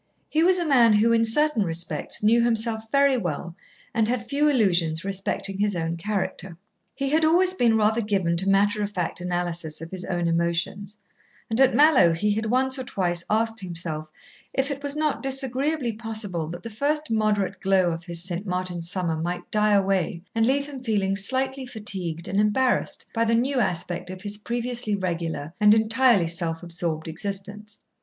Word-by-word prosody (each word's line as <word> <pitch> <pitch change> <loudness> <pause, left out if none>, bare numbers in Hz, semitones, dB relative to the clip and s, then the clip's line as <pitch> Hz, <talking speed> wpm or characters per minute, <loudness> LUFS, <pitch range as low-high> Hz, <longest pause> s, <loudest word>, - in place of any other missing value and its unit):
He 310 - +1
was 370 +1 +4
a 345 - -1
man 245 -7 +5
who, 215 +3 +3
in 230 0 +3
certain 295 +2 +3
respects, 165 -1 -2
knew 230 +2 +4
himself 225 -1 +1
very 280 -1 +3
well 175 -3 -4 0.4
and 225 -2 +1
had 235 -1 -2
few 285 +4 +1
illusions 175 - +1
respecting 195 0 -3
his 205 -1 +1
own 165 0 -2
character. 190 -1 -4 0.4
He 275 0 -2
had 315 +3 +2
always 360 +4 +4
been 235 -10 +2
rather 220 +2 +2
given 195 -5 0
to 190 +3 +2
matter 205 +2 +2
of 205 - -1
fact 180 -3 -3
analysis 175 -3 -3
of 165 +1 -9
his 185 -1 -5
own 175 -2 -1
emotions; 170 +5 -2 0.5
and 225 +4 +1
at 265 - +4
Mallowe 280 - +5
he 205 +6 0
had 220 +2 -1
once 260 +3 +1
or - - -3
twice 175 -7 -1
asked 225 +1 0
himself 165 -4 -5 0.5
if 270 +2 0
it 280 0 -5
was 285 0 +1
not 305 -1 -1
disagreeably 270 0 +1
possible 215 -7 -3
that 175 +1 -8
the 230 - -7
first 295 +5 -1
moderate 215 -3 0
glow 190 -2 +2
of 165 +1 -5
his 170 -1 -1
St. 185 +2 -3
Martin's 180 -2 -3
summer 180 -4 -2
might 175 +2 -4
die 210 0 +2
away 190 -4 0
and 225 0 +2
leave 280 +2 +1
him 275 -3 -9
feeling 200 -5 0
slightly 260 +5 -1
fatigued 185 -7 -2
and 195 +2 +1
embarrassed 245 +4 +1
by 230 - +1
the 230 0 +2
new 260 +3 +1
aspect 180 -4 -2
of 185 0 -8
his 205 0 0
previously 235 -1 -2
regular 170 -5 -4
and 210 0 +6
entirely 220 -3 +3
self 165 0 -1
absorbed 170 -2 -1
existence. 200 +4 -6
210 Hz, 180 wpm, -24 LUFS, 175-240 Hz, 0.5 s, and